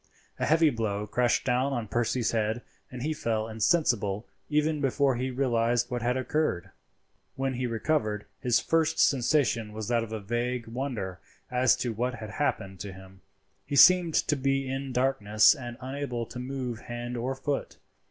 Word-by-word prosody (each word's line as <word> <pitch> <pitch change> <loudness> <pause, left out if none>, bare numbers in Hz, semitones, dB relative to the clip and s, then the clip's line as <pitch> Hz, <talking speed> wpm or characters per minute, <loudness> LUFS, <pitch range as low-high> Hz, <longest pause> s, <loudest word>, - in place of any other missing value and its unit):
A - - 0
heavy 160 -1 +4
blow 105 -3 -2
crashed 120 +3 +1
down 130 +3 +1
on 120 -4 -2
Percy's 120 +2 0
head, 110 +1 -1 0.3
and 125 -1 -7
he 155 +2 0
fell 110 -6 -1
insensible 110 - +1 0.2
even 150 0 +1
before 135 -1 +2
he 130 +2 -2
realized 120 -2 +1
what 120 -1 -2
had 125 +2 +1
occurred. 130 - -1 0.6
When 135 0 -1
he 125 0 -2
recovered, 115 -3 -1
his 120 -2 +2
first 160 0 +1
sensation 120 -5 +2
was 110 0 -5
that 120 -1 +2
of 115 - -8
a 110 - -3
vague 120 +3 -2
wonder 115 -7 -4 0.3
as 125 0 +4
to 120 -2 -2
what 125 +3 -1
had 110 -2 -8
happened 95 -8 -2
to 100 0 -6
him. 95 0 -14 0.4
He 145 - -4
seemed 175 +2 +7
to 150 - +2
be 135 0 0
in 135 +1 -3
darkness 110 -4 +4
and 120 -5 -7
unable 130 -2 -4
to 125 - -8
move 125 -2 -4
hand 120 +1 -6
or 125 +3 -2
foot. 140 +1 -3
125 Hz, 170 wpm, -28 LUFS, 110-135 Hz, 0.6 s, seemed